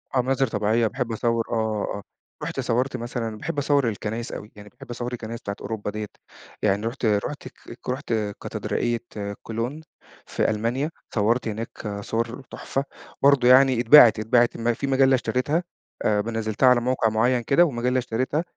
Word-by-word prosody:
آه، 125 - +4
مناظر 135 +1 +1
طبيعية، 110 +1 +1
باحب 125 0 -3
أصور 115 +1 0
آه، - - -1 0.4
آه، 100 - -6 0.4
رُحت - - -4
صورت 125 +4 0
مثلًا 115 -2 -4
باحب 160 +5 -5
أصَوَّر 140 -3 +2
الكنايس 110 +3 -4
أوي، 105 - -8
يعني 105 0 -12
باحب 125 - -15
أصَوَّر 120 +1 -4
الكنايس 115 -1 -6
بتاعة 100 - -4
أوروبا 105 -2 -4
ديّة، 105 0 -4 0.6
يعني 105 +1 +1
رحُت 125 +1 -4
رحُت 110 +7 -1 0.3
ك - - -8
رحُت 125 -2 -2 0.3
كاتدرائية 120 -1 -2 0.4
كولون 120 +7 -4 0.4
في - - 0
ألمانيا، 120 +8 -1 0.2
صَوَّرت 115 +4 +2
هناك 105 -2 -5
صور 115 +5 -3
تحفة 135 - -3 0.4
برضه 140 -3 +5
يعني، 130 -1 +6
اتباعت 120 -3 +8
اتباعت 120 +2 +2
ما 115 +1 +1
في 140 +4 -4
مجلة 135 0 +4
اشترِتها، 145 +7 0 0.4
آآ 105 -1 +3
م 115 - -5
نزّلتها 110 +2 +1
على 125 -1 +4
موقع 125 -2 +1
مُعيّن 120 +3 +2
كده، 145 +9 +4
ومجلة 125 -2 0
اشترِتها، 130 +6 -1
120 Hz, 165 wpm, -24 LUFS, 110-130 Hz, 0.6 s, اتباعت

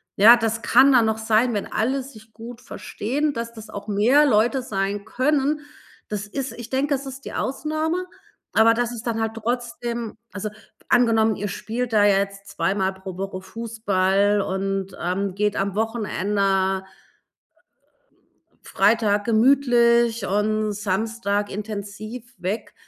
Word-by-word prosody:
ja, 225 +5 +8
das 225 -1 -1
kann 260 +5 +5
dann 240 -3 +5
noch 220 0 0
sein, 220 +2 +2
wenn 205 - -2
alle 260 +5 0
sich 220 -5 -14
gut 230 +2 -10
verstehen, 280 +4 -3
dass 230 -2 -4
das 220 -2 -11
auch 205 0 -8
mehr 235 +9 +4
Leute 240 +1 +3
sein 200 -3 -2
können. 285 +5 +1 0.5
Das 210 -1 -4
ist 270 +6 -4
ich 240 -2 -9
denke, 275 +2 0
das 275 +1 -6
ist 270 0 -9
die - - -7
Ausnahme, 310 +6 -2 0.5
aber 225 +1 +6
das 240 0 -1
ist 235 -1 -7
dann 230 -2 -1
halt 225 0 -1
trotzdem 235 0 -3 0.2
also, 205 +1 -4 0.4
angenommen 225 -2 +4
ihr 205 +1 -4
spielt 235 +5 -4
da 210 -2 +4
jetzt 200 0 +1
2 195 - -1
Mal 190 -1 0
pro 190 -1 -9
Woche 190 -1 -5
Fußball 205 -1 0
und, 195 0 -3
ähm, 185 +2 -2
geht 210 0 0
am 195 0 -1
Wochenende 200 -3 0 1.8
Freitag 210 -3 +2
gemütlich 235 -2 +3
und 215 +2 0
Samstag 205 0 -1
intensiv 215 +3 -7
weg, 190 +5 -4
220 Hz, 140 wpm, -23 LUFS, 200-240 Hz, 1.8 s, ja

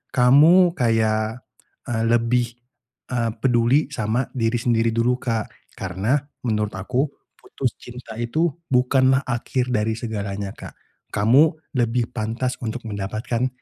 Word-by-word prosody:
kamu 155 +8 +6
kayak, 110 0 +1 0.5
eee, 115 -1 0
lebih, 120 +1 +2 0.7
eee, 120 -2 0
peduli 130 +3 +2
sama 120 0 -1
diri 115 -2 0
sendiri 115 -1 +1
dulu, 125 +2 +1
Kak, 115 -4 -2 0.2
karena 95 +7 -1 0.3
menurut 105 -1 0
aku 125 +7 0 0.3
putus 130 -4 -4
cinta 120 -2 -10
itu 120 +9 0 0.2
bukanlah 130 +1 +3
akhir 125 0 -2
dari 110 0 0
segalanya, 100 -3 -4
Kak, - - -9 0.4
kamu 130 +10 +4 0.2
lebih 120 0 0
pantas 120 +3 -3
untuk 120 +1 -4
mendapatkan 110 +4 -2
120 Hz, 120 wpm, -22 LUFS, 110-125 Hz, 0.7 s, kamu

